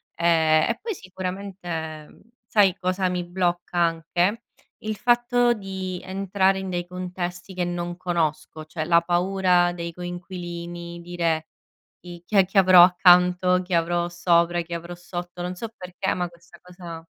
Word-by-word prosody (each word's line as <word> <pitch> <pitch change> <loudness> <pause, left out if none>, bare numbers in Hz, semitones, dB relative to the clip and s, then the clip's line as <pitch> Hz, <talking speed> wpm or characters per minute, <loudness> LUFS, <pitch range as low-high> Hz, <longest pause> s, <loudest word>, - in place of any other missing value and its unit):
ehm, 160 0 +3
e 230 - -5
poi 445 -2 -3
sicuramente 180 - -6 0.3
sai 195 -4 +4
cosa 185 0 0
mi 180 -1 -2
blocca 175 0 -2
anche? 175 +6 +1 0.4
Il 215 0 -4
fatto 240 +1 +3
di 190 -3 -5
entrare 190 0 +1
in 190 -1 -5
dei 175 0 -2
contesti 180 0 -5
che 180 - -1
non 175 0 -3
conosco, 160 -3 -2
cioè 155 0 -4
la 170 0 +4
paura 180 0 +2
dei 170 -1 -5
coinquilini 175 -1 -7
dire 170 -2 -1 0.5
"i 175 -1 -11
chi 210 - -5
è 190 - +6
che 195 +1 +2
avrò 185 -2 +8
accanto, 180 0 +5
chi 180 0 -6
avrò 170 +1 +1
sopra, 175 0 +2
chi 170 +1 -8
avrò 170 +1 -7
sotto" 175 0 -7
non 180 +1 -4
so 230 +5 -5
perché 185 +1 -3
ma 180 -1 -2
questa 170 0 -19
cosa 175 -2 -10
175 Hz, 150 wpm, -24 LUFS, 170-185 Hz, 0.5 s, avrò